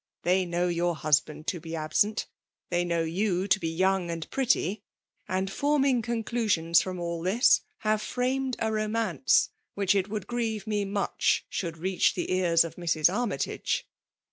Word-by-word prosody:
They 185 +1 +2
know 175 +1 0
your 175 0 0
hus 150 -1 +3
band 155 0 -12
to 175 - -2
be 165 0 -6
absent, 160 +7 0 0.2
— - - -48
^th^ 175 0 +1
know 170 -1 +1
you 185 +3 0
to 205 - +3
bf 165 -3 -3
young 190 -1 +2
and 165 -1 -4
pretty 225 - +1 0.5
^^^and 185 +1 0
formUig 275 +2 +1
oondui^ons 220 -8 +1
from 185 -1 -5
all 170 -1 -3
this, 200 +9 +4 0.2
have 215 0 +1
framed 255 +3 -1
a 220 -1 -1
romance 215 - +1 0.3
wlOfeh 200 -1 +3
it 195 +2 -4
#(Mdd 210 -3 -4
grieve 225 -2 -2
ine 205 -2 -1
mndh 200 -1 -1 0.4
AoxAa 165 -3 -3
reach 185 +2 +1
the - - -2
cars' 175 -3 +3
of 165 - -8
Mrs. 170 -1 +2
Armytage.' 240 +1 -1
190 Hz, 170 wpm, -27 LUFS, 170-215 Hz, 0.5 s, this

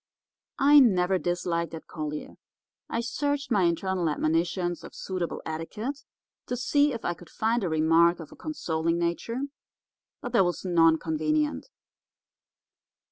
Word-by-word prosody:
I 290 +1 +7
never 190 -7 +4
disliked 170 -1 -1
Ed 160 - -9
Collier. 150 -1 -5 0.6
I 230 - -1
searched 285 +3 -2
my 200 -5 +4
internal 175 0 0
admonitions 170 +3 0
of - - -11
suitable 185 -3 -4
etiquette 210 - -5 0.4
to 250 - -2
see 285 +4 +2
if 230 -3 -5
I 175 - +1
could 175 -1 -15
find 225 +1 0
a 180 - 0
remark 165 +2 +4
of 160 - -9
a - - -12
consoling 165 - -2
nature, 175 +9 -2 0.8
but - - -6
there 195 - +5
was 175 +1 -2
none 165 -3 +5
convenient. 155 - -1
175 Hz, 135 wpm, -27 LUFS, 165-230 Hz, 0.8 s, I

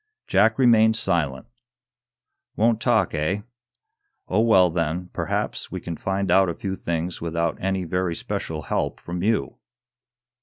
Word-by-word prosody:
Jack 110 +3 +3
remained 110 -4 +5
silent. 85 -9 -1 1.1
"Won't 115 0 +2
talk, - - +2
eh? 85 +7 -1 0.9
Oh, 95 - +1
well, 95 -6 +5
then, 85 +2 -2
perhaps - - -2
we - - -4
can 85 - -6
find 95 +1 -2
out 95 0 +5
a 85 - -3
few 95 -1 -4
things 85 0 -3
without 85 0 -1
any 95 0 -1
very 90 +1 -1
especial - - -4
help - - -2
from 90 0 -5
you." 100 - 0
90 Hz, 140 wpm, -24 LUFS, 85-105 Hz, 1.1 s, remained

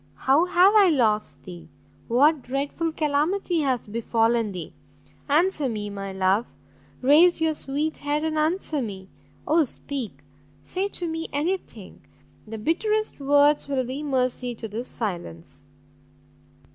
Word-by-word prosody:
how 280 +6 +5
have 365 +3 +5
I 405 -3 +7
lost 220 -8 0
thee? 175 -4 -11 0.4
what 285 +5 +3
dreadful 280 +6 -2
calamity 315 +4 0
has 260 -6 -1
befallen 230 0 +1
thee? 180 -4 -7 0.6
answer 305 -2 +2
me, 210 -2 -4
my 195 -1 -6
love! 190 +4 +1 0.6
raise 325 +7 +6
your 320 -1 +1
sweet 300 +2 -2
head 290 +1 -1
and 315 0 -1
answer 310 -1 0
me! 195 -5 -6 0.4
oh 320 +2 +4
speak! 240 - -6 0.4
say 370 - -2
to 355 -3 -2
me 325 0 -4
any 320 +7 0
thing; - - -15 0.5
the 225 +1 -6
bitterest 425 - -1
words 285 +1 +3
will 265 -2 0
be 260 +4 -5
mercy 255 -3 -1
to 225 - -6
this 225 +4 -5
silence!" 140 - -6
275 Hz, 135 wpm, -24 LUFS, 225-315 Hz, 0.6 s, I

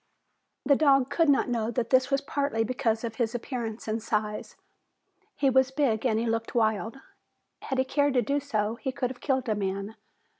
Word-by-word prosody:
The 280 - +5
dog 275 -2 +3
could 325 +1 +3
not 280 - +3
know 230 -3 -1
that 235 0 -2
this 260 0 +4
was 275 0 +1
partly 280 -5 -1
because 225 -1 -1
of 225 -1 -5
his 235 -1 -1
appearance 230 -3 -5
and 220 +1 -1
size. 210 -1 -3 0.8
He 280 - +1
was 265 0 +4
big 265 -4 +1
and 220 -3 +1
he 230 - 0
looked 225 0 -2
wild. 220 +1 +1 0.6
Had 265 - -3
he 260 - +2
cared 285 +1 +1
to 245 - +3
do 280 +6 0
so, 225 -5 -2
he 265 +1 -3
could 250 -1 -2
have 255 - -12
killed 265 -3 0
a 220 - +2
man. 200 +1 -3
245 Hz, 195 wpm, -27 LUFS, 220-270 Hz, 0.8 s, The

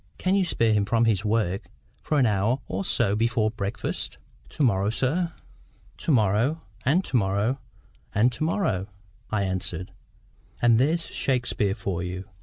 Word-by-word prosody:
Can 185 - +1
you 200 -1 +4
spare 115 -10 +2
him 105 -1 +2
from 115 +3 +2
his 105 -3 +2
work 105 -4 0 0.3
for 150 - 0
an 135 - +5
hour 105 +3 +2
or 95 +1 -3
so 105 -1 +1
before 110 0 +1
breakfast?" 100 -2 -3 0.3
"To 150 - -2
morrow, 100 -5 +3
sir?" 160 +9 0 0.6
"To - - -1
morrow, 120 +6 +2 0.2
and 160 +9 +3
to - - -3
morrow, 105 +4 +1 0.6
and 115 +5 +4
to 125 - -4
morrow," 155 - 0 0.4
I 105 -2 0
answered; 95 -1 -3 0.7
"and 115 -1 +5
there's 160 +6 +2
Shakespeare 125 -6 0
for 90 -3 -3
you." 90 +2 -5
110 Hz, 155 wpm, -26 LUFS, 100-130 Hz, 0.7 s, an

